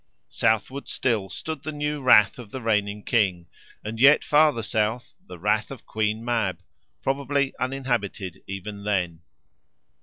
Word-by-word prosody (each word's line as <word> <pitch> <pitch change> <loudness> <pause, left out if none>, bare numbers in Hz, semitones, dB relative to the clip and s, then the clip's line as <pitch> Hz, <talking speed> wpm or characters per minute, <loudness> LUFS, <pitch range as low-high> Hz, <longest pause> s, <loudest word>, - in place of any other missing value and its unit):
Southward 110 +6 0
still 110 -6 -1
stood 155 - -5
the 155 - -4
new 150 0 -3
rath 105 -4 +5
of 115 -4 -9
the 130 - -6
reigning 105 -2 0
king, 95 -8 +1 0.4
and 110 +1 -5
yet 140 +4 +7
farther 150 -6 +3
south, 110 +2 -1
the 90 - -9
rath 105 +4 0
of 135 -4 -10
Queen 110 +1 -1
Mab, 110 -7 -1 0.4
probably 140 0 0
uninhabited 120 -8 -2
even 100 +1 -6
then. 90 -5 -1
110 Hz, 140 wpm, -25 LUFS, 100-135 Hz, 0.4 s, yet